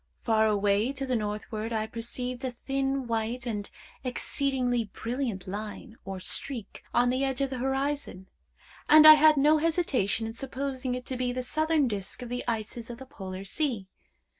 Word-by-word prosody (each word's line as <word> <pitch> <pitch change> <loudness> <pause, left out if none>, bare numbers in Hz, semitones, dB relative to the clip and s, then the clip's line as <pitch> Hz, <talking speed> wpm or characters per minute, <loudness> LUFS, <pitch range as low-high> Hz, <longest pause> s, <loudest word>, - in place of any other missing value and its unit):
Far 220 -1 +3
away 205 +3 +2
to 275 0 -3
the 255 -1 0
northward 215 +1 -3
I 220 -1 0
perceived 245 +3 -4
a 260 - 0
thin, 270 +2 -2
white, 230 +1 -2
and 210 -4 -3 0.3
exceedingly 250 -2 0
brilliant 230 -2 -4
line, 215 +4 -6
or 190 -1 -5
streak, 230 +3 -1
on 245 +1 +3
the 260 +2 0
edge 270 -1 -1
of 275 -1 0
the 260 - -3
horizon, 270 -7 -2 0.6
and 310 0 +9
I 310 - +13
had 310 0 +6
no 300 +3 +5
hesitation 295 - +1
in 225 - -5
supposing 260 0 -3
it 250 -1 -6
to 260 - -3
be 250 0 0
the 255 +1 -3
southern 310 +1 +2
disk 205 +2 -4
of 240 - -7
the 245 0 -3
ices 225 0 -3
of 240 - -6
the 265 - -10
Polar 190 -5 -7
Sea. 220 -3 -2
245 Hz, 175 wpm, -28 LUFS, 220-270 Hz, 0.6 s, I